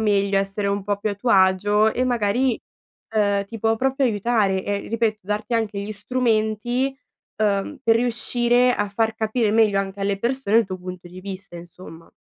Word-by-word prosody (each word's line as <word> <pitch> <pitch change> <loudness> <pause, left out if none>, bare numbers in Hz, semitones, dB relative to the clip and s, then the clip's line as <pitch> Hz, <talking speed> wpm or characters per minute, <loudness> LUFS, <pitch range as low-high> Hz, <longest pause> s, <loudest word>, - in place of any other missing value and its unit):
meglio, 200 -2 +2
essere 195 +1 -2
un 200 0 -1
po' 205 0 -1
più 215 - -2
a - - -3
tuo 230 +4 -2
agio 205 +3 +4
e 255 - -1
magari, 245 0 +1 0.5
uhm, 205 -2 +2
ti 225 +3 -9
può 225 0 +2
proprio 265 +3 0
aiutare, 205 -4 +1
ehm, 200 0 -3
ripeto, 220 -2 0
darti 210 +4 -3
anche 215 -3 -1
gli 205 +2 -4
strumenti, 235 +3 0 0.4
uhm, 210 +7 0
per 225 -3 +4
riuscire 240 +1 +2
a 205 - -1
far 220 +2 0
capire 220 0 0
meglio 215 -3 +3
anche 195 0 -4
alle 195 0 -1
persone 235 -2 0
il 230 -3 +4
tuo 185 -1 -6
punto 180 0 -8
di 180 +1 -11
vista, 195 -1 -8
insomma. 170 -1 -12
210 Hz, 180 wpm, -22 LUFS, 200-230 Hz, 0.5 s, agio